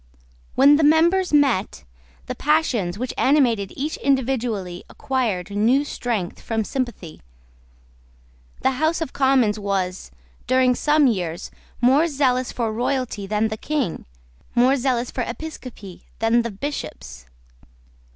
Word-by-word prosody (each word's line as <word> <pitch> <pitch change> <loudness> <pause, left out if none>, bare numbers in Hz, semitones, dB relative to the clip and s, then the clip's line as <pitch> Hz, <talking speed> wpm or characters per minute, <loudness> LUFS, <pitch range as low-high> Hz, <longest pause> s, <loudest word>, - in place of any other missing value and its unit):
When 285 +2 +6
the 315 - +1
members 340 +5 +4
met, 270 - +2 0.4
the - - -4
passions 255 - 0
which 255 +3 -4
animated 240 -8 +2
each 300 +4 -3
individually 240 -9 -1
acquired 230 -10 -2
new 235 +8 +2
strength 225 -10 -3
from 225 -1 -2
sympathy. 240 - -5 1.4
The 265 - +2
House 315 +1 +2
of 320 - -4
Commons 260 -6 +2
was, 195 -2 -2 0.4
during 255 0 +3
some 295 +3 +3
years, 180 -9 -1 0.3
more 270 +7 +4
zealous 260 -4 0
for 230 -3 -2
royalty 240 -3 -2
than 215 +2 0
the 220 - -4
King, 280 - -3 0.5
more 250 +3 +4
zealous 250 -2 -1
for 255 - -3
episcopacy 240 - -8
than 225 +2 +2
the 235 - -3
Bishops. 205 - -7
250 Hz, 120 wpm, -22 LUFS, 210-280 Hz, 1.4 s, When